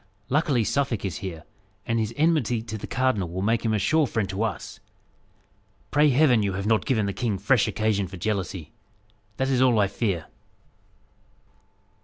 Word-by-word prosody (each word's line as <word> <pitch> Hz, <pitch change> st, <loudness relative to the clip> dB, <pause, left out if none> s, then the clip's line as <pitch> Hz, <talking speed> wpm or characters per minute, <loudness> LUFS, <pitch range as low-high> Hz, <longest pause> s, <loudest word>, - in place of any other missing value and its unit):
Luckily, 140 Hz, -4 st, +2 dB
Suffolk 125 Hz, -4 st, -1 dB
is 95 Hz, -, -3 dB
here, 85 Hz, -6 st, -6 dB, 0.4 s
and 115 Hz, 0 st, 0 dB
his 110 Hz, 0 st, -1 dB
enmity 145 Hz, -8 st, +2 dB
to 110 Hz, -1 st, -6 dB
the 105 Hz, -, -6 dB
cardinal 125 Hz, -9 st, 0 dB
will 95 Hz, +3 st, -4 dB
make 115 Hz, +2 st, +1 dB
him 115 Hz, -, +1 dB
a 110 Hz, -, +2 dB
sure 155 Hz, +9 st, +2 dB
friend 110 Hz, -4 st, -1 dB
to 95 Hz, +2 st, -3 dB
us. 115 Hz, -, -3 dB, 1.1 s
Pray 150 Hz, +1 st, +4 dB
Heaven 130 Hz, -4 st, +4 dB
you 100 Hz, -2 st, -1 dB
have 100 Hz, +1 st, -3 dB
not 110 Hz, 0 st, +1 dB
given 110 Hz, -6 st, +1 dB
the 100 Hz, -, -2 dB
king 110 Hz, -3 st, -1 dB
fresh 125 Hz, +2 st, +2 dB
occasion 110 Hz, -3 st, 0 dB
for 95 Hz, -, -9 dB
jealousy! 95 Hz, -5 st, -3 dB, 0.7 s
That 130 Hz, 0 st, 0 dB
is 130 Hz, -2 st, +2 dB
all 125 Hz, -3 st, +4 dB
I 100 Hz, -, +4 dB
fear." 95 Hz, -5 st, -2 dB
110 Hz, 175 wpm, -25 LUFS, 100-130 Hz, 1.1 s, Pray